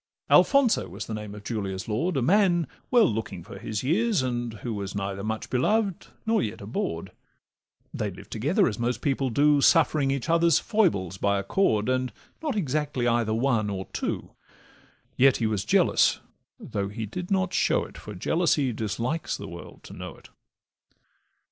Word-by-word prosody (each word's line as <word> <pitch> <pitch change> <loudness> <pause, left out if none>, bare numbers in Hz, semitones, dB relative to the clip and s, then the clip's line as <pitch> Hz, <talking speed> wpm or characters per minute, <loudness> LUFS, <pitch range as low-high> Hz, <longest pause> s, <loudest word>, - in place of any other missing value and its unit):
Alfonso 275 -5 +4
was 100 +5 -6
the 110 - -6
name 105 -1 -6
of 105 - -10
Julia's 100 -4 -4
lord, 140 +10 -1
A 130 - +1
man 175 - +3 0.2
well 240 -3 +5
looking 110 - -4
for 110 +7 -10
his 110 0 -4
years, 190 - +2
and 120 -2 -2
who 120 - -2
Was 100 -1 -5
neither 100 0 -3
much 110 +1 -4
beloved 195 - +1 0.2
nor 225 0 +2
yet 105 - -3
abhorr'd: 95 -4 -4 0.8
They 105 - -2
lived 95 +2 -12
together, 150 - +2
as 110 -2 -3
most 120 +1 -1
people 135 -2 0
do, 145 +3 +3
Suffering 150 -2 +4
each 135 +1 -2
other's 170 -1 +4
foibles 130 - +1
by 100 0 +2
accord, 105 - +1
And 130 -1 0 0.3
not 300 -6 -2
exactly 150 - -1
either 115 -2 +1
one 115 -4 +1
or 95 -1 -4
two; - - -3 0.9
Yet 135 0 +5
he 115 - -1
was 105 -3 0
jealous, - - +3 0.4
though 100 -1 -3
he 105 +3 -5
did 175 - -6
not 190 -2 +1
show - - +2
it, - - -14
For 105 - -9
jealousy 145 - +1
dislikes 115 +9 -2
the - - -8
world 85 0 -11
to - - -11
know - - -8
it. - - -17
120 Hz, 170 wpm, -26 LUFS, 105-165 Hz, 0.9 s, well